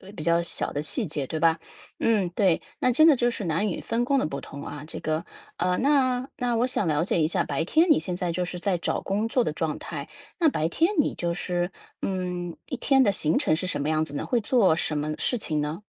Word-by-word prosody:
比 155 - -5
较 170 0 +3
小 170 - -1
的 145 - -2
细 220 - 0
节， 145 -4 -3
对 160 - -3
吧？ 165 0 +3 0.4
嗯， 210 -6 +2
对， 180 -1 +2 0.2
那 250 -1 +3
真 310 +5 +6
的 300 -5 +6
就 240 0 +2
是 225 - -5
男 170 +5 0
女 180 - -3
分 235 +1 -1
工 275 +1 +2
的 - - +1
不 140 -2 -4
同 140 +1 -9
啊。 145 0 -7
这 - - -7
个， 155 +2 -1 0.3
呃， 180 +1 +1
那 260 -2 +2
那 245 -1 0
我 235 +2 +2
想 205 -7 0
了 150 +1 +2
解 175 - +1
一 155 - +3
下， 175 +1 +1
白 150 +3 -2
天 320 - +4
你 - - +5
现 180 -2 -3
在 175 -1 -2
就 180 +1 -1
是 180 0 -6
在 195 -4 +1
找 - - -2
工 210 +3 -1
作 245 +1 +2
的 - - -1
状 155 -1 -2
态， 145 -3 -6 0.3
那 330 - +4
白 160 - -1
天 335 - +2
你 - - -1
就 170 -1 -1
是， 175 0 -2 0.3
嗯， 180 -2 -3
一 265 - -4
天 270 -1 +4
的 200 - +4
行 155 -5 +1
程 155 - +2
是 185 - -3
什 145 - -2
么 150 - -1
样 155 0 +2
子 145 - -6
呢？ - - -3
会 245 - +1
做 205 -7 +3
什 155 -2 -1
么 150 +1 -2
事 245 - 0
情 155 -8 -1
呢？ 155 +6 -3
180 Hz, 275 characters per minute, -26 LUFS, 160-235 Hz, 0.4 s, 真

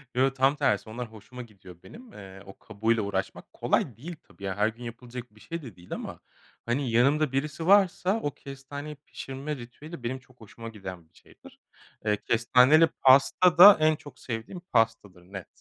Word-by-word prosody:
Yo, 135 +2 +3
tam 135 +2 +2
tersi 105 -4 0
onlar 120 0 -7
hoşuma 125 +3 -11
gidiyor 95 -6 -14
benim. 240 0 -14
Eee, 95 -1 -12
o 95 - -14
kabuğuyla 110 +1 -1
uğraşmak 95 -1 -5
kolay 120 -6 -1
değil 165 +7 -8
tabii, 100 - -18
ya, 95 -1 -3
her 105 +1 +3
gün 115 +2 -7
yapılacak 120 -1 -9
bir - - -19
şey 165 +6 -7
de 120 - -11
değil 90 0 -10
ama, - - -7 0.5
hani, 120 +1 -1
yanımda 140 +5 +3
birisi 150 +4 -3
varsa 195 +1 +3
o 145 - -2
kestaneyi 140 +3 -9
pişirme 140 +1 -7
ritüeli 130 +4 -11
benim 130 +3 -3
çok 130 -2 -25
hoşuma 115 +2 -10
giden 95 -6 -10
bir - - -45
şeydir. - - -19 0.5
Eee, 105 -1 +1
kestaneli 130 +7 +4
pasta 140 +7 +4
da 200 +3 +10
en 155 0 +3
çok 145 -1 -14
sevdiğim 120 +9 -6
pastadır. 115 - -1
Net. 95 0 -9
125 Hz, 175 wpm, -27 LUFS, 110-145 Hz, 0.5 s, da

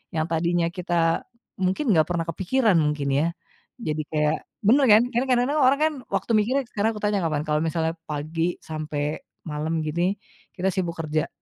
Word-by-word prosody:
yang 155 -1 +1
tadinya 170 +1 +1
kita 175 +3 0 0.4
mungkin 190 +7 +1
gak 155 - +4
pernah 170 -1 -1
kepikiran 200 +5 +1
mungkin 150 -2 0
ya, 150 +4 +2 0.5
jadi 155 -9 -2
kayak 150 0 +1 0.3
bener 265 +6 +5
kan? 215 +2 +8
Kan 245 +1 +1
kadang-kadang 255 +4 +2
orang 270 +2 +4
kan 315 0 +3 0.2
waktu 195 +3 -1
mikirnya 255 +6 +1
sekarang 220 +2 0
aku 210 - -5
tanya 205 -1 +2
kapan, 155 -3 0
kalau 150 0 +1
misalnya 160 0 -1
pagi 160 +3 -2
sampai 155 -1 -3 0.3
malam 155 +2 -2
gini 175 +5 0 0.4
kita 190 0 -1
sibuk 175 -3 -2
kerja, 155 -1 -1
170 Hz, 170 wpm, -24 LUFS, 155-210 Hz, 0.5 s, kan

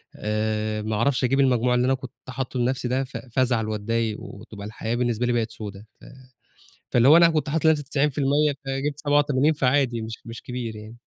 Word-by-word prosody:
آآ 110 0 -1
ما 110 0 -2
أعرفش 130 +4 +1
أجيب 135 +2 +2
المجموع 125 -2 +3
اللي 125 0 +2
أنا 130 - +3
كنت 130 -2 -6 0.2
حاطّه 130 0 -4
لنفْسي 125 +1 0
ده 130 +2 0
ف 135 - -7
فازعل 120 -3 0
وأتضايق 110 +1 -1
وتبقى 105 -1 -9
الحياة 110 +2 -3
بالنسبة 120 -1 0
لي 120 - +1
بقت 115 -2 0
سودا، 100 -1 -8 0.2
ف - - -14 0.9
فاللي 120 +1 +4
هو 155 +4 +9
أنا 170 -1 +7
كنت 155 -2 -1
حاطط 160 +2 -1
لنفْسي 155 -2 +4
90% 145 +1 +1
فجبت 140 +2 -2
87 145 0 +2
فعادي 130 -4 +1
مش 110 0 -7
مش 115 0 -8
كبير 125 -3 -5
يعني. 110 +2 -10
125 Hz, 190 wpm, -24 LUFS, 110-140 Hz, 0.9 s, هو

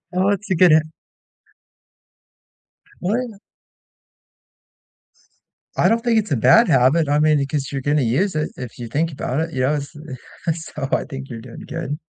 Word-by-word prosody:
Oh, 185 +2 +1
it's 205 +1 -1
a 185 - +3
good 175 0 +6
h 155 0 +6 2.2
Well, 215 +8 0
ya 210 - -12 2.4
I - - +4
don't 230 0 +2
think 235 -2 +2
it's 210 -7 -1
a - - +2
bad 230 - +5
habit. 140 +3 +3
I 145 +1 +2
mean, 155 -1 +4
y 140 - 0
'cause 140 -3 -2
you're 135 -1 -3
gonna 145 +1 +1
use 155 - +1
it 155 0 -1
if 125 -2 -8
you 120 - -6
think 155 +7 -1
about 135 +1 -2
it. 165 0 -3
Yeah, 130 +3 +1
it's 140 0 -8 0.8
so 140 -3 -3
I - - +1
think 135 -1 -8
you're 115 -1 -6
doing 115 0 -11
good, 160 -2 -4
150 Hz, 175 wpm, -21 LUFS, 135-180 Hz, 2.4 s, good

